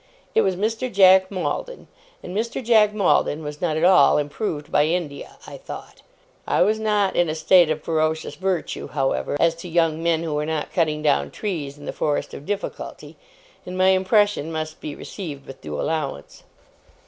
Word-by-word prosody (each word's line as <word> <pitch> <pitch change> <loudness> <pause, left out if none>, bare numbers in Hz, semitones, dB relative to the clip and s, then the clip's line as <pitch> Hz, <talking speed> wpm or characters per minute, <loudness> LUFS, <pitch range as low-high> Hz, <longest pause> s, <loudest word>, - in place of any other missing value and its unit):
It 450 - +4
was 190 - +1
Mr. 225 +6 -2
Jack 190 -1 +6
Maldon; 205 - -4 0.4
and 180 - -7
Mr. 230 +4 -2
Jack 220 -3 +5
Maldon 185 -6 +1
was 150 0 -7
not 160 -3 0
at 160 - -1
all 180 -6 +6
improved 150 +1 -3
by 145 - +4
India, 160 -4 -4
I - - -9
thought. - - -10 0.5
I - - +3
was 215 +1 +1
in 220 - -3
a 190 -6 +1
state 170 +1 +5
of 155 -1 -2
ferocious 160 -1 -1
virtue, 185 +1 -3
however, 135 +1 -1
as 165 -1 +3
to 175 +1 -8
young 165 -1 +1
men 165 -1 +1
who 160 -2 -3
were 150 0 -1
not 160 -2 -3
cutting 155 -3 0
down 70 - +2
trees 150 - -4
in 145 - -12
the - - -4
forest 150 -1 -2
of 145 - -9
difficulty; 205 -1 -5 0.5
and 180 0 -7
my 185 0 +4
impression 190 -3 +2
must 155 -1 -5
be 150 - -6
received 150 -8 -8
with 135 - -11
due 75 -1 -5
allowance. 145 - -4
165 Hz, 180 wpm, -23 LUFS, 150-190 Hz, 0.5 s, Jack